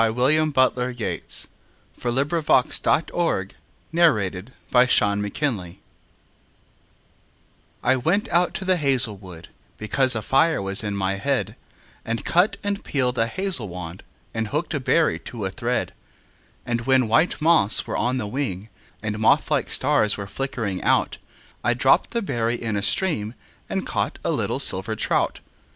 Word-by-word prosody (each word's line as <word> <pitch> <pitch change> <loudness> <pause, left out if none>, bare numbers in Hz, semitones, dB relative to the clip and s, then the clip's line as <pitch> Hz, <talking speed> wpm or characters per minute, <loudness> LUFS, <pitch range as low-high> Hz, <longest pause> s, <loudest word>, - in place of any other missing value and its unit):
William 140 +7 +2
Butler 130 -3 +2
Yeats 120 -3 -2 0.5
The - - -22
Song 120 - -1
of 140 +2 +1
Wandering 155 - +1 1.6
Aengus 100 - -2 2.1
I 130 +2 +4
WENT 175 +11 +1
out 175 +1 +2
to 190 - -4
the 185 -1 +2
hazel 135 -7 +3
wood, 90 -4 -12 0.3
Because 130 +4 +1
a 110 - -3
fire 160 +8 +2
was 100 +2 -1
in 100 -1 -3
my 95 0 0
head, 110 -2 -1 0.5
And 115 0 -4
cut 180 +5 +2
and 200 0 -2
peeled 125 -3 -1
a 115 - +2
hazel 185 - 0
wand, 90 -1 -8 0.3
And 110 -1 -2
hooked 150 +8 -3
a 145 - -1
berry 155 +5 +2
to 110 -5 -6
a 95 - -3
thread; 120 +4 -2 0.7
And 120 -1 -1
when 130 -3 +4
white 155 +11 +2
moths 160 -10 +3
were - - -4
on 125 +2 0
the 110 - -2
wing, 105 -4 -4 0.3
And 110 -1 -3
moth 110 - +3
like - - +1
stars 105 -1 +2
were 100 - -5
flickering 115 -4 -4
out, - - +1 0.4
I 120 +1 +2
dropped 130 +2 +3
the 235 -1 -2
berry 120 -8 -1
in 115 -2 -3
a 100 - -1
stream 115 - 0 0.3
And - - -2
caught - - -2
a - - 0
little - - -1
silver - - 0
trout. - - 0
125 Hz, 150 wpm, -23 LUFS, 105-145 Hz, 2.1 s, I